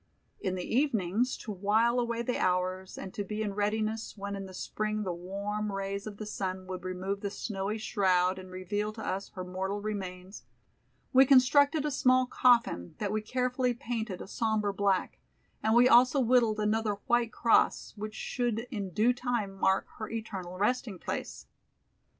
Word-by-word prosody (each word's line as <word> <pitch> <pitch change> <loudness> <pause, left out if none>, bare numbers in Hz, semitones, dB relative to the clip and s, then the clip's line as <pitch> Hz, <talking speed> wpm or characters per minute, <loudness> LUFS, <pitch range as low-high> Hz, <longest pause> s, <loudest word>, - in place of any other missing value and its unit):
In 185 -1 -2
the 180 - -3
evenings, 230 -3 +1
to 220 - -7
while 220 +5 +2
away 235 -1 -1
the 250 +1 -1
hours 185 +1 0
and 190 - -7
to 205 - -3
be 210 +2 -3
in 205 -2 -2
readiness 215 +2 -1
when 200 0 -4
in 195 -1 -6
the 190 - -11
Spring 215 +2 -2
the 185 -3 -2
warm 200 +4 -3
rays 195 +1 -3
of 205 -1 -7
the 215 - -6
sun 190 -2 -4
would 185 -1 -6
remove 185 +2 -3
the 200 - -2
snowy 205 0 -3
shroud 190 -4 +2
and 185 0 -10
reveal 205 +3 -3
to 220 0 -7
us 195 +1 -3
her 185 - -4
mortal 190 +2 -3
remains, 190 -2 -6 0.7
we 260 +1 +8
constructed 285 +3 +5
a 300 - 0
small 255 -1 +4
coffin, 235 - +2
that 205 -2 -2
we 215 0 0
carefully 250 +2 0
painted 225 -5 -4
a - - -11
somber 215 -1 0
black, 195 -1 0 0.4
and 220 +1 +2
we 245 +1 +7
also 250 +3 +6
whittled 235 -3 +3
another 215 0 +1
white 240 -1 +2
cross, 230 +1 +2
which 215 +1 -6
should 240 -2 -1
in 200 -5 -3
due 220 +7 +3
time 240 -5 -2
mark 190 0 +2
her 220 - -4
eternal 195 -6 -5
resting 210 0 0
place. - - -5
210 Hz, 175 wpm, -30 LUFS, 190-235 Hz, 0.7 s, we